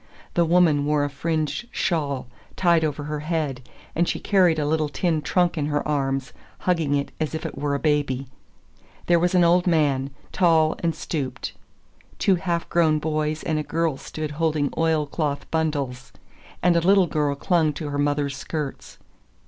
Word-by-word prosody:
The 170 - +3
woman 165 -4 +4
wore 150 -1 +2
a 145 - -2
fringed 155 +8 -2
shawl 140 -6 -1 0.3
tied 170 -3 +3
over 150 -1 -2
her 150 0 -3
head, 150 -4 -2 0.3
and 170 +1 +2
she - - -2
carried 180 -5 +3
a 150 - 0
little 155 0 +1
tin 160 +2 0
trunk 175 +1 +1
in 145 - 0
her 145 0 -1
arms, 135 -3 -1 0.3
hugging 165 -6 +1
it 140 0 -2
as 155 0 -2
if 160 - -5
it - - -5
were 145 -1 -1
a - - -1
baby. 145 -3 0 0.8
There 175 -1 +4
was 180 +2 +1
an 180 - +5
old 175 +2 +4
man, 145 -5 +2 0.2
tall 160 -3 +3
and 165 -2 -1
stooped. 135 -5 -4 0.6
Two 195 - +3
half 170 -1 -2
grown 160 -3 +3
boys 155 0 -1
and 155 -1 0
a - - -2
girl 165 -1 0
stood 155 +2 -6
holding 150 -2 0
oil 160 -2 +2
cloth 145 -1 -2
bundles, 140 -6 -2 0.5
and 175 0 +4
a 170 - +3
little 190 +2 +5
girl 150 -3 0
clung 160 +1 +2
to 150 0 -5
her 145 0 -3
mother's 145 -1 0
skirts. 150 0 -5
155 Hz, 175 wpm, -24 LUFS, 145-170 Hz, 0.8 s, an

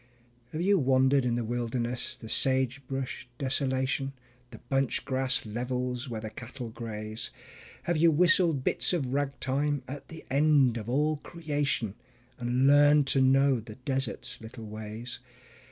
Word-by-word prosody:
Have 155 - -3
you 200 0 +4
wandered 130 0 +3
in 120 -1 +1
the 120 - -1
wilderness, 120 +1 -2
the 110 - -10
sagebrush 130 +1 0
desolation, 135 0 -1 0.4
The - - -10
bunch 135 -1 -1
grass 130 -1 0
levels 125 +3 -3
where 110 -2 -4
the 110 -1 -6
cattle 120 +1 -7
graze? 110 0 -5 0.5
Have 175 -1 0
you 165 +2 +6
whistled 170 -3 +4
bits - - +1
of 135 -7 -1
rag 140 0 -1
time 140 +1 0
at 140 +2 -7
the 160 -1 -11
end 140 -4 +4
of 110 0 -6
all 150 +4 +2
creation, 145 - -2 0.5
And 125 +2 +1
learned 145 +1 +6
to 135 - +3
know 135 0 +4
the 110 -1 -10
desert's 130 -2 -3
little 110 0 -9
ways? 110 +3 -6
130 Hz, 145 wpm, -29 LUFS, 120-140 Hz, 0.5 s, you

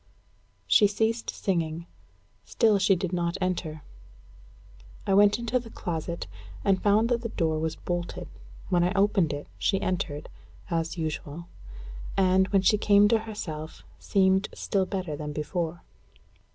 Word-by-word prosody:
She 210 - +6
ceased 220 +3 -1
singing. 170 -4 -2 0.6
Still 220 -4 +2
she 195 0 +4
did 180 0 -3
not 170 -1 -1
enter. 170 -5 -2 1.2
I 195 - +1
went 205 +1 +6
into 235 +1 0
the 235 -1 -11
closet, 170 -3 -4 0.4
and 195 -1 +3
found 210 +2 +4
that 240 -1 +1
the 230 - -4
door 160 -6 0
was 160 0 -2
bolted. 175 -1 -4 0.4
When 175 -2 +3
I 180 +2 +1
opened 195 -4 +3
it, 145 0 -5
she 195 - +1
entered, 170 -6 -2 0.4
as 165 +1 -1
usual; 160 0 -4 0.7
and, 190 0 +4
when 195 -1 +2
she 210 +2 +4
came 205 0 +5
to 225 0 +4
herself, 155 -7 -6 0.2
seemed 190 0 +2
still 195 -3 0
better 185 -6 -3
than 150 0 -5
before. 165 +2 -3
185 Hz, 140 wpm, -27 LUFS, 165-205 Hz, 1.2 s, She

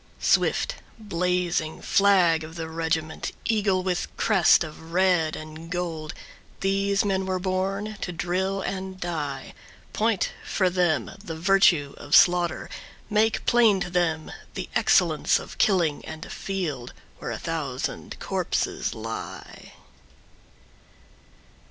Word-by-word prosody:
Swift - - +2 0.2
blazing 180 -5 -1
flag 180 -5 +4
of 160 +1 -9
the 165 -1 -4
regiment, 160 -1 -2
Eagle 200 -4 +1
with 180 -1 -1
crest 190 -6 +5
of 160 +1 -10
red 180 -4 +3
and 155 +1 -9
gold, 165 -3 -4 0.5
These 195 +1 +1
men 190 -1 0
were 185 -1 0
born 195 +3 -2
to 180 - -3
drill 185 +3 -1
and 190 -1 -4
die. 150 -6 -4 0.4
Point 220 -2 +1
for 185 -3 +1
them 175 -4 +1
the 165 -5 -5
virtue 170 -4 +3
of 145 - +1
slaughter, 175 -1 +4 0.4
Make 220 +1 +2
plain 230 -5 +5
to 175 - -3
them 165 -3 0 0.2
the - - -5
excellence - - +3
of - - -9
killing 175 -8 +2
And 160 +1 -7
a - - -10
field 160 -11 -4 0.3
where - - -5
a - - -3
thousand 150 -6 -4
corpses - - -1
lie. 115 0 -7
180 Hz, 120 wpm, -25 LUFS, 160-195 Hz, 0.5 s, crest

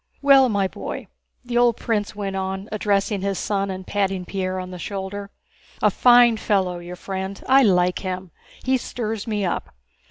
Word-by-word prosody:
Well, 275 -2 +7
my 200 -3 +1
boy," - - -6 0.4
the 240 0 0
old 240 -2 +4
prince 210 -2 -2
went 200 -2 -3
on, 190 +1 -3
addressing 205 -1 0
his 195 -1 -1
son 200 -1 -1
and 190 0 -5
patting 195 -2 -1
Pierre 185 0 -3
on 185 0 -6
the 180 - -8
shoulder. 200 +1 -5 0.5
"A - - +3
fine 240 -2 +6
fellow—your 180 -4 -1
friend—I 195 +8 +1
like 180 -5 +3
him! 185 -2 -5 0.3
He 260 0 +2
stirs 225 -3 -4
me 210 -3 -1
up. 175 - -3
200 Hz, 160 wpm, -23 LUFS, 190-220 Hz, 0.5 s, Well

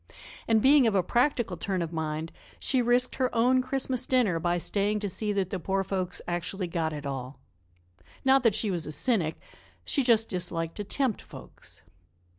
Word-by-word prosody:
And, 220 -2 +3
being 275 -2 +6
of 215 - +1
a 190 - +3
practical 240 - +1
turn 185 +1 -1
of 165 0 -6
mind, 160 0 -3 0.3
she 260 -2 +1
risked 245 +1 +2
her 255 -1 +1
own 250 +3 +4
Christmas 260 -1 -1
dinner 230 -10 +2
by 175 +1 0
staying 205 +4 0
to 205 - -1
see 210 +3 -2
that 195 -2 -1
the 190 - -2
poor 195 +3 -1
folks 185 -2 -3
actually 175 +2 -3
got 165 -2 -2
it 145 -2 -6
all. 135 -1 -5 0.9
Not 265 0 +5
that 230 -5 +3
she 215 -2 0
was 170 -3 -3
a - - -4
cynic; 170 -4 0 0.5
she 280 - +1
just 230 -3 +3
disliked 165 -2 -3
to 205 - -3
tempt 245 +2 -1
folks. - - -12
200 Hz, 185 wpm, -28 LUFS, 170-245 Hz, 0.9 s, being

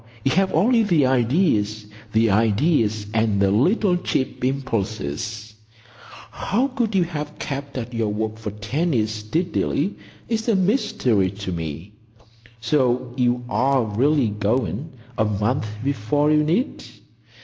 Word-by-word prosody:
You 135 - +2
have 190 +5 +2
only 230 +9 +3
the 170 -10 +3
ideas—the 110 - +1
ideas 110 - +2
and 110 -2 +1
the 100 -1 +3
little 180 - +3
cheap 130 -7 -2
impulses. 110 - -3 0.8
How 225 +6 -1
you 275 - +1
could 240 -5 -1
have 155 -5 -1
kept 140 0 -5
at 125 0 -5
your 115 -2 0
work 110 +1 -3
for 110 - -4
ten 125 - -2
years 110 -3 +1
steadily 150 - -1 0.3
is 225 0 -1
a 225 - +4
mystery 190 - +1
to 100 0 -6
me. 80 +2 -5 0.7
So 125 0 +1
you 125 -1 +1
are 130 +1 +2
really 125 +4 +2
going,—a 120 +3 -2
month 105 +3 0 0.2
before 140 +3 +1
you 150 0 +4
need?" 180 - 0
125 Hz, 125 wpm, -22 LUFS, 110-155 Hz, 0.8 s, a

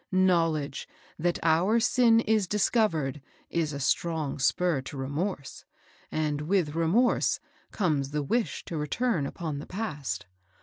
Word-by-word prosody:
Knowledge 165 -6 +1 0.3
that 175 +2 +1
our 170 +8 +3
sin 230 -1 +4
is 215 -3 +1
discov 215 +2 +3
ered, 145 -2 -3 0.3
is 165 -3 0
a 140 - -5
strong 155 +1 -1
spur 155 +2 +2
to 135 +2 -8
remorse, 145 +3 -4 0.5
and 150 -2 -1
with 165 -2 +1
remorse 170 +10 +2 0.3
comes 150 -9 0
the 150 0 -2
wish 230 - -1
to 170 - -5
return 155 - 0
upon 155 -3 -4
the - - -8
past. 185 -9 -4
165 Hz, 135 wpm, -28 LUFS, 145-200 Hz, 0.5 s, sin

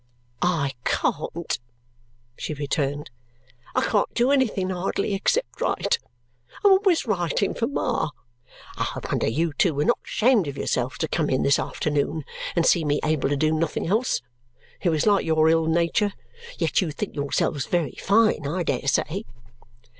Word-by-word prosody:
"I 165 -6 +1
can't," 165 -1 -1 0.8
she 155 - -5
returned. 145 0 -2 0.6
"I - - +3
can't 205 - +1
do 245 +3 +3
anything 220 -9 +1
hardly, 190 +2 -1
except 325 - 0
write. 475 - +1 0.7
I'm 400 - +8
always 380 -3 +4
writing 190 - 0
for 230 - -1
Ma. 250 - -1 0.7
I - - -2
wonder - - 0
you 155 +7 0
two 160 +1 +2
were 145 - +1
not 240 - +2
ashamed 220 - +2
of 140 -1 -5
yourselves 125 +1 -1
to 160 - -1
come 155 -1 0
in 130 - +1
this 140 -1 +4
afternoon 150 0 -1 0.3
and 170 -1 +2
see 170 - +4
me 150 -1 +1
able 155 -3 +1
to 145 - 0
do 155 +2 +2
nothing 160 0 -1
else. 215 - +1 0.6
It 180 - +2
was 155 -2 +1
like 205 -2 +4
your 160 -1 +3
ill 165 0 +3
nature. 170 +5 +1 0.4
Yet - - +1
you 180 - -1
think 170 +7 -5
yourselves 145 0 -1
very 170 -6 0
fine, 210 -7 +3
I 175 +5 -1
dare 140 - -2
say!" 170 +9 0
165 Hz, 160 wpm, -24 LUFS, 150-205 Hz, 0.8 s, I'm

